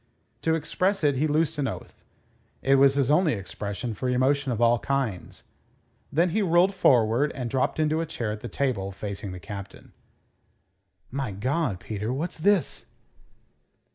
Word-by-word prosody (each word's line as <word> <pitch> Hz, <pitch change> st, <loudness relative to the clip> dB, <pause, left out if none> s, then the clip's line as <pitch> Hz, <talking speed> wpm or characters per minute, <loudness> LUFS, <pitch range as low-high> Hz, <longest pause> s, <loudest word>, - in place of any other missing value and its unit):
To 160 Hz, 0 st, +2 dB
express 185 Hz, +4 st, 0 dB
it 145 Hz, -3 st, +3 dB
he 155 Hz, +4 st, +2 dB
loosed 155 Hz, 0 st, +1 dB
an 140 Hz, -, +1 dB
oath. -, -, -8 dB, 0.6 s
It 135 Hz, 0 st, +4 dB
was 135 Hz, 0 st, +5 dB
his 140 Hz, -1 st, +2 dB
only 160 Hz, -1 st, +4 dB
expression 105 Hz, +3 st, -5 dB
for 125 Hz, +5 st, -3 dB
emotion 135 Hz, +2 st, +2 dB
of 115 Hz, -, -2 dB
all 120 Hz, 0 st, +4 dB
kinds. 125 Hz, -6 st, -3 dB, 0.7 s
Then 170 Hz, +4 st, +2 dB
he 215 Hz, +5 st, +1 dB
rolled 180 Hz, +1 st, +4 dB
forward, 125 Hz, -, +3 dB
and 125 Hz, -4 st, -4 dB
dropped 135 Hz, +3 st, 0 dB
into 155 Hz, +1 st, +1 dB
a 165 Hz, -, -3 dB
chair 145 Hz, -9 st, -3 dB
at 105 Hz, -, -5 dB
the -, -, -5 dB
table, 115 Hz, -9 st, -1 dB
facing 100 Hz, 0 st, -6 dB
the 90 Hz, -, -7 dB
Captain. 100 Hz, 0 st, -9 dB, 1.2 s
"My 135 Hz, -1 st, -2 dB
God, 125 Hz, -, -1 dB
Peter, 110 Hz, +3 st, -4 dB
what's 155 Hz, +6 st, -3 dB
this?" 195 Hz, -2 st, +1 dB
135 Hz, 160 wpm, -26 LUFS, 110-155 Hz, 1.2 s, was